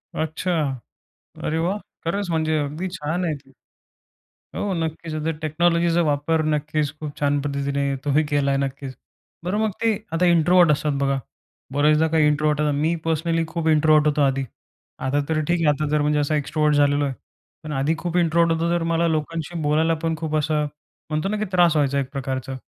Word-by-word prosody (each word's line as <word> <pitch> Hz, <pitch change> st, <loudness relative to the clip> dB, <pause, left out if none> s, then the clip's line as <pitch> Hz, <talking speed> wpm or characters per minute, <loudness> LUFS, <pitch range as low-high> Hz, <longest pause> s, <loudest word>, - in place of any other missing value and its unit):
अच्छा. 160 Hz, +3 st, -2 dB, 0.9 s
अरे 160 Hz, +1 st, 0 dB
वाह! 180 Hz, +5 st, 0 dB, 0.3 s
खरंच 195 Hz, +4 st, -1 dB
म्हणजे, 160 Hz, -1 st, +1 dB
अगदी 150 Hz, +6 st, -3 dB
छान 160 Hz, +5 st, -2 dB
आहे 160 Hz, -3 st, 0 dB
ते. 135 Hz, -1 st, -14 dB, 1.1 s
हो, 205 Hz, -2 st, -1 dB
नक्कीच. 160 Hz, 0 st, -4 dB
आता 155 Hz, +1 st, -1 dB
टेक्नॉलॉजीचा 170 Hz, +2 st, +2 dB
वापर 150 Hz, +3 st, +1 dB
नक्कीच 150 Hz, 0 st, -1 dB
खूप 150 Hz, -2 st, -6 dB
छान 145 Hz, 0 st, +2 dB
पद्धतीने 140 Hz, 0 st, -1 dB, 0.2 s
तुम्ही 145 Hz, +2 st, +2 dB
केला 140 Hz, -1 st, +2 dB
आहे, 135 Hz, -, +1 dB
नक्कीच. 135 Hz, -1 st, -6 dB, 0.5 s
बरं 195 Hz, +4 st, -1 dB
मग 215 Hz, -, +1 dB
ते, 225 Hz, -1 st, +3 dB, 0.2 s
आता 180 Hz, +2 st, +2 dB
इंट्रोव्हर्ट 170 Hz, 0 st, +5 dB
असतात 150 Hz, 0 st, 0 dB
बघा. 135 Hz, 0 st, +1 dB, 0.5 s
बऱ्याचदा 150 Hz, +2 st, +3 dB
काही 155 Hz, -1 st, +3 dB
इंट्रोव्हर्ट 150 Hz, 0 st, +1 dB
आता 150 Hz, -1 st, +2 dB
मी 160 Hz, +2 st, +2 dB
पर्सनली 165 Hz, +1 st, 0 dB
खूप 165 Hz, -1 st, -2 dB
इंट्रोव्हर्ट 155 Hz, -1 st, +4 dB
होतो 150 Hz, 0 st, +2 dB
आधी. 135 Hz, 0 st, +1 dB, 0.6 s
आता 145 Hz, +2 st, +1 dB
तर 160 Hz, -1 st, +1 dB
ठीक 175 Hz, +2 st, 0 dB
आहे, 150 Hz, -, +4 dB
आता 150 Hz, +1 st, +1 dB
जर 150 Hz, 0 st, +2 dB
म्हणजे 150 Hz, 0 st, +1 dB
असा 145 Hz, +1 st, 0 dB
एक्स्ट्रोव्हर्ट 150 Hz, +1 st, +1 dB
झालेलो 145 Hz, 0 st, +3 dB
आहे. 135 Hz, -2 st, -2 dB, 0.5 s
पण 155 Hz, -1 st, -6 dB
आधी 140 Hz, +4 st, +1 dB
खूप 175 Hz, 0 st, -3 dB
इंट्रोव्हर्ट 170 Hz, -1 st, +3 dB
होतो, 170 Hz, +1 st, +1 dB
तर 170 Hz, -, 0 dB
मला 170 Hz, +1 st, +2 dB
लोकांशी 160 Hz, +1 st, -3 dB
बोलायला 155 Hz, +2 st, +2 dB
पण 165 Hz, 0 st, +1 dB
खूप 155 Hz, -1 st, -2 dB
असं, 150 Hz, 0 st, +1 dB, 0.4 s
म्हणतो 155 Hz, +5 st, -1 dB
ना 215 Hz, -, -1 dB
की 215 Hz, -, -1 dB
त्रास 175 Hz, -3 st, +4 dB
व्हायचा 140 Hz, -2 st, +2 dB
एक 135 Hz, -2 st, -2 dB
प्रकारचा. 130 Hz, -1 st, -4 dB
155 Hz, 185 wpm, -23 LUFS, 145-165 Hz, 1.1 s, इंट्रोव्हर्ट